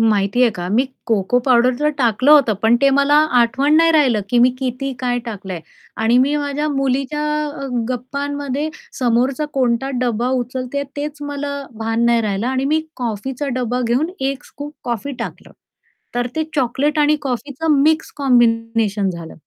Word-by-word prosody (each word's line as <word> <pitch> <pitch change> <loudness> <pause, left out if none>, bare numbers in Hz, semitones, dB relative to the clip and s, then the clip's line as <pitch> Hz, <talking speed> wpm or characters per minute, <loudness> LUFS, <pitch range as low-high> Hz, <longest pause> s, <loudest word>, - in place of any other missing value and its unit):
माहिती 215 +1 +2
आहे 240 - +5
का 175 -4 -6
मी 225 +7 +2 0.2
कोको 225 +1 +2
पावडरच 255 +4 +2
टाकलं 250 +2 +2
होतं, 280 -7 +6
पण 225 +2 +5
ते 275 - +6
मला 280 +1 +3 0.3
आठवण 265 +6 +2
नाही 330 +1 +5
राहिलं, 260 -9 +3
की 245 - +2
मी 250 +1 +6
किती 265 +1 -3
काय 245 -1 0
टाकलंय 195 -6 -6 0.4
आणि 230 +2 +3
मी 275 +3 +3
माझ्या 290 +1 -2
मुलीच्या 275 +1 -1 0.4
अ, - - -3 0.2
गप्पांमध्ये 280 +3 -3 0.3
समोरचा 255 +4 +1
कोणता 255 0 0
डब्बा 240 0 0
उचलतेय 255 +3 -4
तेच 295 0 -5
मला 285 0 -4 0.2
भान 225 +1 0
नाही 235 -1 +3
राहिलं 205 +1 -1
आणि 260 +1 0
मी 315 - +2 0.2
कॉफीचा 250 +4 -3
डब्बा 250 0 -1
घेऊन 285 +9 +1
1 270 0 -2
स्कूप 290 +1 -9
कॉफी 240 +4 -3
टाकलं. - - -7 0.6
तर 245 0 0
ते 315 - +1
चॉकलेट 280 +3 0
आणि 300 +1 +4
कॉफीचं 280 +3 0
मिक्स 315 +1 +2
कॉम्बिनेशन 230 -6 +2
झालं. 170 -2 -7
255 Hz, 155 wpm, -19 LUFS, 235-285 Hz, 0.6 s, होतं